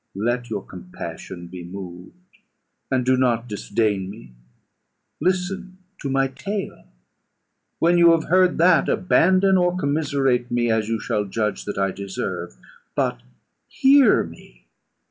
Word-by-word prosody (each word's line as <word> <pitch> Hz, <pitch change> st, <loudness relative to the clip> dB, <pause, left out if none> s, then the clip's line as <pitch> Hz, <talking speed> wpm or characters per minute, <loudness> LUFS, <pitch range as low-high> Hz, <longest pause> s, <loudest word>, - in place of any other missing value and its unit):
Let 120 Hz, +4 st, -1 dB
your 105 Hz, -3 st, -4 dB
compassion 90 Hz, 0 st, -8 dB
be 90 Hz, 0 st, -9 dB
moved, 95 Hz, -, -11 dB, 0.5 s
and 130 Hz, -2 st, 0 dB
do 130 Hz, +1 st, +4 dB
not 125 Hz, -2 st, +1 dB
disdain 105 Hz, -2 st, -1 dB
me. 60 Hz, -, -11 dB, 0.9 s
Listen 185 Hz, +1 st, -2 dB, 0.2 s
to 140 Hz, -, -4 dB
my 135 Hz, 0 st, +2 dB
tale: 200 Hz, +8 st, -5 dB, 0.9 s
when 175 Hz, +1 st, +3 dB
you 170 Hz, -1 st, +7 dB
have 165 Hz, -1 st, +1 dB
heard 185 Hz, +2 st, +3 dB
that, 170 Hz, +1 st, +4 dB
abandon 185 Hz, +1 st, +3 dB
or 180 Hz, 0 st, +1 dB
commiserate 140 Hz, -6 st, 0 dB
me, 120 Hz, -1 st, +1 dB
as 110 Hz, -1 st, 0 dB
you 115 Hz, -1 st, -1 dB
shall 105 Hz, -2 st, -1 dB
judge 105 Hz, 0 st, -2 dB
that 105 Hz, -, -5 dB
I 95 Hz, -1 st, +1 dB
deserve. 95 Hz, -10 st, -5 dB, 0.4 s
But -, -, -1 dB, 0.5 s
hear 270 Hz, -3 st, +5 dB
me. 60 Hz, -7 st, -14 dB
125 Hz, 130 wpm, -22 LUFS, -, 0.9 s, you